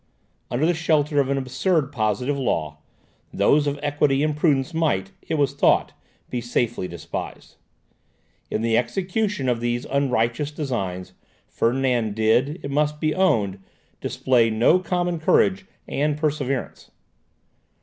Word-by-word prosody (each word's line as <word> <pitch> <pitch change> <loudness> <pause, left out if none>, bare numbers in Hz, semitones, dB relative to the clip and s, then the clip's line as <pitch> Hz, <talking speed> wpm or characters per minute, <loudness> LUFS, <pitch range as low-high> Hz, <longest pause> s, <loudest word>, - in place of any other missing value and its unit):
Under 130 +6 0
the 175 - +3
shelter 155 -2 +1
of 135 -1 +1
an 140 - +1
absurd 135 +3 0
positive 125 +2 0
law, 80 - -2 0.5
those 145 0 +3
of 145 0 -2
equity 145 -1 +1
and 150 -1 0
prudence 150 0 +1
might, 120 -13 0
it - - -3
was 140 -2 +1
thought, 140 - +2 0.4
be 125 - -2
safely 120 -4 -1
despised. 85 -3 -7 0.9
In 110 - -2
the 115 -1 +2
execution 195 - -2
of 120 -2 +1
these 120 +1 -2
unrighteous 135 0 0
designs, 105 - -4 0.3
Ferdinand 120 -3 0
did, 120 +9 +2
it 140 - -4
must 150 +1 0
be 155 -1 +1
owned, 105 - +1 0.4
display 120 -3 +2
no 115 +11 +4
common 175 -1 -1
courage 190 +4 +2 0.2
and 150 +1 0
perseverance. 140 -4 -2
140 Hz, 130 wpm, -23 LUFS, 120-150 Hz, 0.9 s, no